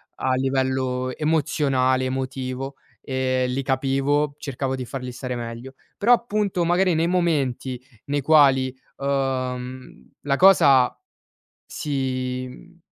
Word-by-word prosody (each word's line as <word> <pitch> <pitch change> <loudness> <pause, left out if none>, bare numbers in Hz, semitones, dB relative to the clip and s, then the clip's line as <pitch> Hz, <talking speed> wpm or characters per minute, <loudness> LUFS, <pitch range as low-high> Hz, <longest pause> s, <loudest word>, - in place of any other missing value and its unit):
a 130 - 0
livello 130 -1 -1
emozionale, 140 -4 +1
emotivo, 130 0 -4 0.3
ehm, 130 -1 0
li 135 +2 -1
capivo, 135 +2 0
cercavo 135 -1 -3
di 130 - -5
farli 125 +1 -6
stare 125 0 -5
meglio. 120 +2 -7 0.2
Però, 230 +4 +2
appunto, 210 -6 0
magari, 175 +1 +2
nei 165 +1 +1
momenti 140 -8 0 0.3
nei 145 0 -1
quali, 135 -3 +4 0.2
uhm, 130 -2 -3
la 140 -1 0
cosa 145 -10 +5 0.7
si, 130 -3 -3
mhmm, 170 +7 -15
135 Hz, 110 wpm, -23 LUFS, 130-145 Hz, 0.7 s, cosa